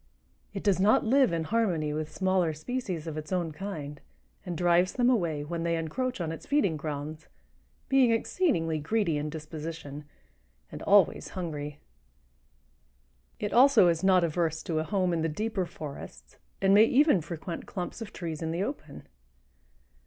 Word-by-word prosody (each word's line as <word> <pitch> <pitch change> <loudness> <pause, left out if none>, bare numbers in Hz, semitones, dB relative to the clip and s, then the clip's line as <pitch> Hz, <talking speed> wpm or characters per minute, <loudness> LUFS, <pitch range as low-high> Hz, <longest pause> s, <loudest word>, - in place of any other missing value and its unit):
"It 195 - -6
does 195 -4 +2
not 205 +5 +4
live 260 0 +4
in 165 -1 -1
harmony 170 -7 0
with 155 0 -4
smaller 185 -4 +1
species 185 -3 -4
of 155 -1 -4
its 155 - -10
own 175 -3 -1
kind, 150 -5 -6 0.4
and 175 -3 -5
drives 175 +1 +3
them 250 0 +3
away 165 -10 0
when 165 +3 -4
they 170 0 0
encroach 250 +11 -3
on 165 -2 -2
its 165 -1 -8
feeding 285 - +2
grounds, 155 +1 -5 0.6
being 270 -3 +4
exceedingly 225 - +1
greedy 165 -1 0
in 150 +1 -3
disposition 155 -1 -7 0.7
and - - -8
always 200 -3 +4
hungry." 150 -4 -4 1.6
It 205 - -3
also 250 -8 +6
is 165 +1 0
not 185 -2 +5
adverse 160 -1 -1
to 160 -2 -1
a - - 0
home 185 0 0
in 165 - 0
the 165 - 0
deeper 195 +2 -2
forests 150 -4 -9 0.3
and 195 0 +5
may 210 +2 +8
even 270 - +4
frequent 170 +1 -6
clumps 180 +4 -5
of 225 - -6
trees 165 -3 -5
in 160 - -2
the 170 +4 -1
open. 200 - -7
170 Hz, 160 wpm, -28 LUFS, 155-205 Hz, 1.6 s, may